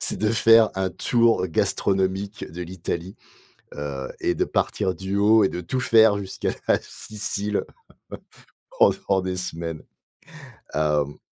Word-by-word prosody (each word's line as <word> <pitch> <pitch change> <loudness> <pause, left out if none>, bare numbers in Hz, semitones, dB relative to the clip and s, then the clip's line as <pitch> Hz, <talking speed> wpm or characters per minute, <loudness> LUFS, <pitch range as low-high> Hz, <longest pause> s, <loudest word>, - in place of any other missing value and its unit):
c'est - - -1
de 110 0 0
faire 115 0 +5
un 95 0 -1
tour 115 -1 +2
gastronomique 95 +3 -1
de 90 +3 -6
l'Italie, 90 +1 -5 0.6
heu 70 -2 -5
et - - 0
de - - 0
partir 95 -3 -1
du 95 +3 -4
haut 105 +1 +5
et - - +3
de 90 - -5
tout 90 +10 -3
faire 110 -4 +5
jusqu'à 95 -2 -3 0.2
la - - +4
Sicile 105 -1 -3 1.1
pendant 100 - +3
des 95 0 -3
semaines. 85 -3 -4 0.9
Hem, 75 -2 0
95 Hz, 135 wpm, -23 LUFS, 85-105 Hz, 1.1 s, faire